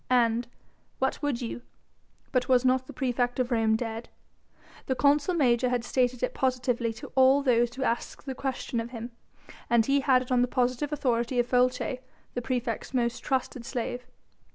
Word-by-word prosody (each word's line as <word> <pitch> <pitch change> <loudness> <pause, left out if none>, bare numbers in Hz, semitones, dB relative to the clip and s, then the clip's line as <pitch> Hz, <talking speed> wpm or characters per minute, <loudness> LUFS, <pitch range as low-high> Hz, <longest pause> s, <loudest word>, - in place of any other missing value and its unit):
And 240 -1 +2 0.5
what 265 +1 -1
would 275 -4 -1
you? 240 +1 -5 0.7
but 250 -1 0
was 255 0 +4
not 255 0 +2
the - - -8
praefect 245 -1 -1
of 250 0 0
Rome 225 -2 +3
dead? 225 0 -4 0.8
The 260 - +1
consul 290 +6 +3
major 250 -5 +3
had 245 -1 0
stated 250 0 0
it 250 - 0
positively 250 -3 0
to 230 - -10
all 265 +1 +5
those 240 -2 +2
who 265 - -3
asked 235 +3 -2
the 270 - -3
question 260 -2 -3
of 230 +1 -4
him, 235 0 -7 0.6
and 235 -2 +4
he 275 +2 +3
had 260 -2 +3
it 255 - -11
on 250 -1 +4
the 250 - +3
positive 255 +4 0
authority 245 -3 0
of 240 - +3
Folces, 250 +1 +1 0.3
the 245 - -2
praefect's 245 0 -3
most 240 -1 0
trusted 260 -2 -2
slave. 245 0 -4
250 Hz, 175 wpm, -28 LUFS, 240-260 Hz, 0.8 s, all